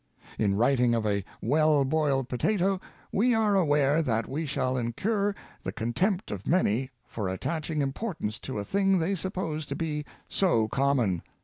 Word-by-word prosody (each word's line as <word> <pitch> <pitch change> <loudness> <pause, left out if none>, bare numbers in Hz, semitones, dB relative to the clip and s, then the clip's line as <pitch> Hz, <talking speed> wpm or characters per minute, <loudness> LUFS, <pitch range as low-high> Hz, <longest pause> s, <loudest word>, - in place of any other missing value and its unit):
In 100 -2 +2
writ 125 +4 +3
ing 120 -1 +4
of 115 -2 -1
a 100 -2 +1 0.2
well 150 +3 +3
boiled 140 -3 +1
potato, 190 - +1 0.3
we 240 +4 +3
are 215 -2 +3
aware 150 -4 +3
that 115 -7 0
we 155 +3 -3
shall 130 -2 0
incur 200 - 0 0.3
the - - -4
contempt 175 - -1
of 100 -2 -6
many 130 - +2 0.2
for 105 -4 -4
attaching 155 - -2
importance 135 - -3
to 130 - -5
a 100 - -3
thing 195 - +2
they 175 +3 0
suppose 180 -4 -3
to 140 - -3
be 150 -2 -2 0.2
so 140 - +2
common. 125 -11 +1
145 Hz, 165 wpm, -28 LUFS, 120-185 Hz, 0.3 s, ing